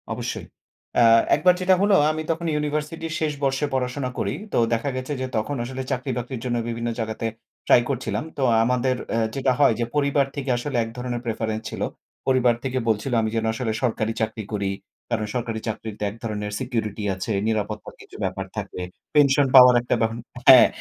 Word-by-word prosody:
অবশ্যই। - - -4 0.5
অ্যা 120 - +6 0.3
একবার 180 0 +4
যেটা 185 +1 +5
হলো, 200 0 +4 0.2
আমি 155 0 -3
তখন 165 +1 -3
ইউনিভার্সিটির 150 +2 -2
শেষ 155 -1 0
বর্ষে 135 +1 +1
পড়াশোনা 130 +1 -1
করি। - - -1 0.2
তো - - +2 0.2
দেখা 115 +5 0
গেছে 130 +3 -3
যে, - - 0
তখন 110 +7 -1
আসলে 130 +2 -5
চাকরি-বাকরির 125 -1 -3
জন্য 120 -1 0
বিভিন্ন 115 0 -2
জায়গাতে 110 0 -2 0.4
ট্রাই 120 - +7
করছিলাম। 135 +1 -2
তো 135 - 0 0.2
আমাদের 125 +2 +1 0.2
অ্যা 115 - +1 0.2
যেটা 135 -1 +2
হয় 140 -5 +6
যে, 120 - +1
পরিবার 140 -1 +2
থেকে 140 -2 -4
আসলে 125 +1 -3
এক 115 - -6
ধরনের 125 -1 -3
প্রেফারেন্স 110 -1 -2
ছিল। - - -7 0.5
পরিবার 125 -2 +4
থেকে 130 -1 -2
বলছিল, 110 +4 0
আমি 110 - 0
যেন 115 0 0
আসলে 110 0 -2
সরকারি 115 -2 0
চাকরি 110 0 -2
করি। 100 -2 -1 0.4
কারণ 115 -3 -1
সরকারি 115 -2 -2
চাকরিতে 110 -1 -5
এক 100 - -10
ধরনের 105 -2 -3
সিকিউরিটি 110 -3 -3
আছে, 95 +4 -4 0.2
নিরাপত্তার 105 -1 -3
কিছু - - -15
ব্যাপার 95 0 -2
থাকে। 100 -3 -5 0.3
পেনশন 140 -1 +5
পাওয়ার 125 -1 +10
একটা 120 - 0
বহন 115 0 0 0.3
হ্যাঁ, 130 -2 +10
125 Hz, 180 wpm, -24 LUFS, 110-135 Hz, 0.5 s, পাওয়ার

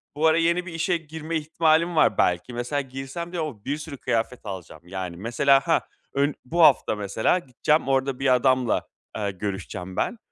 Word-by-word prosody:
bu 155 +2 +3
ara 160 - +4
yeni 170 +2 +2
bir 175 - -8
işe 170 +2 +1
girme 160 +1 -5
ihtimalim 160 +2 +2
var 155 - +4
belki. 90 +7 +1
Mesela 125 +4 -1
girsem 135 +5 -6
bir 180 - -5
de 165 - 0
o 125 -10 -5
bir 145 +2 -1
sürü 155 -3 -8
kıyafet 120 0 -1
alacağım. 90 -5 -7
Yani 90 -2 -5
mesela, 130 +6 +3
ha, 165 - +3 0.3
ön 140 +1 +1
bu 170 +6 0
hafta 140 -7 +5
mesela 105 - +1
gideceğim, 145 +2 0
orada 135 -1 +1
bir 130 -2 +4
adamla, 130 -1 +2 0.3
eee, 100 -2 -1
görüşeceğim 95 -1 -5
ben. 235 - -1
135 Hz, 185 wpm, -25 LUFS, 110-160 Hz, 0.3 s, hafta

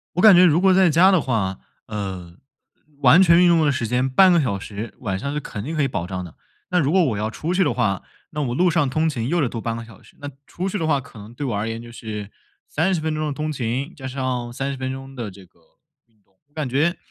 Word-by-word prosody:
我 180 - +1
感 215 -4 +9
觉 180 - +7
如 170 0 +4
果 190 0 +5
在 185 -1 +5
家 175 +5 +6
的 185 -4 +4
话， 100 -8 -1 0.3
呃， 95 -5 -6 0.7
完 170 - +7
全 170 0 +6
运 180 - +6
动 165 -2 +4
的 145 - +3
时 120 -3 -2
间 125 +3 0
半 185 +7 +5
个 170 - +4
小 110 -9 -1
时， 105 +2 -7
晚 100 -6 -2
上 140 +8 -4
是 150 - -2
肯 110 -7 -7
定 160 +5 -4
可 155 - +1
以 135 - +1
保 95 -8 -3
障 90 -1 -5
的。 85 - -12 0.3
那 180 - +2
如 150 -2 +1
果 185 -1 +4
我 115 -9 -1
要 105 +1 -1
出 160 +9 -4
去 190 +1 +3
的 120 - 0
话， 100 -7 0 0.3
那 150 - -5
我 120 -3 -2
路 180 +5 +3
上 145 -3 +1
通 155 +5 +1
勤 120 -6 -3
又 175 +3 +1
得 135 - +1
多 115 - -5
半 115 0 -3
个 115 - -7
小 115 -3 -16
时， - - -21
那 145 - -6 0.2
出 185 +2 -4
去 205 - -3
的 160 - -1
话 145 -3 +2
可 120 - -14
能 105 +3 -11
对 145 - -5
我 120 -6 -2
而 105 +2 -2
言 115 +1 -5
就 120 - -11
是 105 -3 -7 0.4
30 175 +3 0
分 155 0 -2
钟 155 0 -2
的 150 - -2
通 155 +2 -3
勤， 130 +3 -3
加 130 - -8
上 130 -2 -3
30 135 +2 -3
分 130 0 -3
钟 135 0 -9
的 115 -6 -5
这 95 0 -14
个 85 - -28 0.5
运 110 -3 -38
动， 95 - -40
我 - - -39
感 155 -4 -3
觉， 150 +8 +1
130 Hz, 290 characters per minute, -22 LUFS, 115-160 Hz, 0.7 s, 感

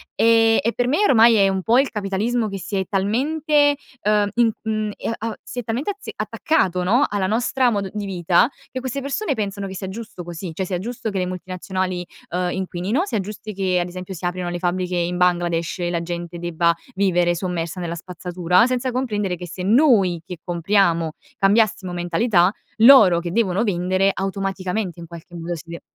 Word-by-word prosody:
Ehm, 225 0 +4
e 230 - 0
per 245 0 +1
me 295 - +2
ormai 230 -2 +6
è 200 -2 +5
un 190 -1 0
po' 235 +6 +4
il 275 - +2
capitalismo 215 +2 -1
che 195 - -5
si 200 - -5
è 190 - 0
talmente, 290 - +2 0.3
uhm, 210 0 +3
in 235 -1 +4
mhmm, 215 -1 -1
ehm, - - -3
a 225 +1 -3
si 250 - -7
è - - -4
talmente 235 - -2
azze 405 - -8
attaccato, 185 - 0
no, 240 +10 +3
alla 200 -2 -1
nostra 245 +4 +1
modo 200 -3 -1
di 210 -1 -3
vita, 180 - +2 0.2
che 255 - -5
queste 260 +1 -3
persone 280 +5 -2
pensano 200 -4 -3
che 190 - -7
sia 190 - -5
giusto 205 -3 -7
così, 175 +1 -6
cioè 190 +4 -3
sia 180 -1 -2
giusto 230 +2 -4
che 195 -2 -2
le 180 - 0
multinazionali, 185 0 -4 0.3
uhm, 180 0 0
inquinino, 190 - -1
sia 220 - -2
giusti 210 +2 -7
che 185 -2 0
ad 175 - -1
esempio, 185 +1 -7
si 175 - -6
aprano 175 0 -2
le 175 - -3
fabbriche 180 0 -1
in 175 0 -1
Bangladesh 175 -2 +1
e 175 0 -1
la 170 -1 -1
gente 175 0 -5
debba 170 0 +1 0.2
vivere 175 -3 +2
sommersa 175 0 -3
nella 170 -1 -3
spazzatura, 180 +2 +1
senza 255 0 -1
comprendere 210 -7 -1
che 180 0 -8
se 180 +2 -7
noi 205 - +4
che 180 - -7
compriamo, 170 -2 +1 0.2
cambiassimo 195 -2 +2
mentalità, 175 +2 +2 0.3
loro 220 -7 +8
che 170 0 -5
devono 200 -2 +1
vendere, 185 -1 +1
automaticamente 195 -1 -3
in 170 - -8
qualche 170 +1 -11
modo 170 +1 -4
si 165 +1 -11
de 170 0 -7
190 Hz, 195 wpm, -21 LUFS, 175-225 Hz, 0.3 s, loro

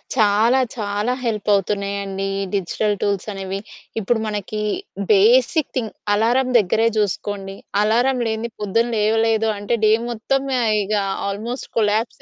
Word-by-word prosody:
చాలా 220 +3 +4 0.2
చాలా 210 +1 -1
హెల్ప్ 215 -3 -2
అవుతున్నాయండి. 200 0 -1
ఈ - - -1
డిజిటల్ 205 +3 0
టూల్స్ 200 -1 -1
అనేవి. 195 0 -4 0.4
ఇప్పుడు 220 +2 0
మనకి 210 0 -3 0.5
బేసిక్ 245 - +4
థింగ్ 225 -4 -2 0.2
అలారం 235 +5 +2
దగ్గరే 220 +3 +2
జూసుకోండి. 200 -1 -2 0.3
అలారం 245 +4 +2
లేనిది 220 +1 -3
పొద్దున్న 230 +4 +1
లేవలేదు 225 +1 +2
అంటే, 205 +4 -1
డే 215 - +5 0.2
మొత్తం 250 +4 -1 0.2
ఆహ్, 220 -2 +2
ఇగ 210 - -3 0.4
ఆల్మోస్ట్ 225 +6 -5
కొలాప్స్ 220 +1 0
215 Hz, 130 wpm, -21 LUFS, 200-230 Hz, 0.5 s, డే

